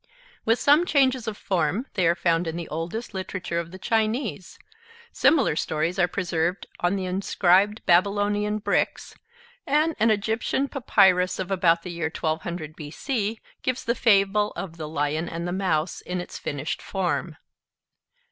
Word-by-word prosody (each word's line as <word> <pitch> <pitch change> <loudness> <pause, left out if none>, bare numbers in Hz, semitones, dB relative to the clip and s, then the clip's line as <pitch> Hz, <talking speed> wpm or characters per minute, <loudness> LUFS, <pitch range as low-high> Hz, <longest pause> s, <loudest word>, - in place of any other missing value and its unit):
With 225 +1 +3
some 295 +8 +4
changes 260 -5 +2
of 215 -2 -3
form 185 - 0
they 185 -4 +2
are 170 - +3
found 170 -1 +1
in 160 - -3
the 170 - -5
oldest 165 +9 -4
literature 185 -2 -3
of 170 -1 -5
the 185 - -10
Chinese; 220 0 -1 0.5
similar 275 - +3
stories 160 +4 -1
are 175 - +4
preserved 175 -1 -1
on 175 +3 +1
the 190 -1 -2
inscribed 190 +2 +2
Babylonian 205 +3 +2
bricks; 215 - -1 0.5
and 305 +3 +2
an 225 - +4
Egyptian 220 +6 0
papyrus 190 -8 +3
of 190 0 -4
about 170 -3 +3
the 180 - -6
year 170 -2 -2
1200 160 0 -3
B.C. 215 - -3 0.2
gives 255 -1 -2
the 235 - +1
fable 210 -2 +3
of 170 -3 -6
'The 155 -2 -5
Lion 155 +2 -1
and 170 +1 -4
the - - -2
Mouse' 180 -4 -1
in 180 0 -4
its 175 - -7
finished 145 +1 -4
form. 190 -3 -2
185 Hz, 155 wpm, -25 LUFS, 170-215 Hz, 0.5 s, some